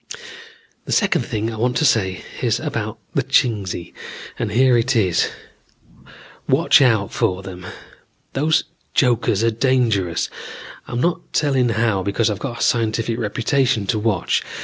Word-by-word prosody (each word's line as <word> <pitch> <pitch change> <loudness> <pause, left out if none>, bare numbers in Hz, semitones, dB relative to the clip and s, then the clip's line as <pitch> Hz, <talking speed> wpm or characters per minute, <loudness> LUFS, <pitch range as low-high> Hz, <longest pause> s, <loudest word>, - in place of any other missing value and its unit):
"The - - -6
second 190 -5 +1
thing 115 -3 -2
I - - -7
want 120 +2 0
to 155 - +2
say 95 -8 +1 0.2
is - - +1
about - - -4 0.2
the - - +2
Chingsi, 100 -7 0 0.5
and - - -2
here 125 +3 +4
it 120 +3 +1
is: 95 -6 +2 1.2
watch - - +5
out 110 -6 +2
for 95 +1 0
them. 90 -1 -9 0.7
Those 155 +3 +2 0.3
jokers 120 -5 +2
are 115 - +3
dangerous. 115 -8 +1 0.6
I'm 120 - -3
not 175 +3 -2
telling 135 -5 +2
how 110 -3 +1
because 100 +3 0
I've 100 - -4
got 120 -4 -5
a - - +2
scientific 115 0 0
reputation 115 +1 0
to 105 +3 0
watch. 105 -1 0
115 Hz, 145 wpm, -20 LUFS, 100-125 Hz, 1.2 s, watch